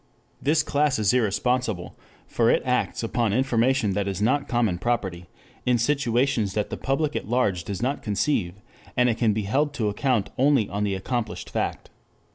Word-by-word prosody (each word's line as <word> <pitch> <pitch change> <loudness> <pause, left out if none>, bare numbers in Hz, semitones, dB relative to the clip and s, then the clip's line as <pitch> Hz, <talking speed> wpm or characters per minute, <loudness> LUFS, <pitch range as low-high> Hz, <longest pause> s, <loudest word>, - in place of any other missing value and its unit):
This 150 +2 +2
class 145 -1 +1
is 105 -1 +2
irresponsible, 120 -3 0 0.3
for 115 -1 +1
it - - +3
acts 125 -2 0
upon 115 -2 0
information 125 -2 +2
that 100 0 -1
is 95 -1 -3
not 135 +7 +1
common 115 -8 0
property, 95 -6 -2 0.4
in 125 -1 +2
situations 120 -4 +1
that 105 - -1
the - - -2
public 145 +2 -1
at - - -3
large 105 -8 +1
does 100 +5 -4
not 135 +3 -1
conceive, 100 -4 0 0.4
and 125 0 +4
it 115 - -1
can 115 -3 +3
be 105 0 -1
held 140 +8 0
to 110 -6 0
account 115 0 0
only 135 -5 +4
on 100 +1 -3
the 100 -1 -1
accomplished 115 +4 -4
fact. - - -3
120 Hz, 175 wpm, -25 LUFS, 105-130 Hz, 0.4 s, and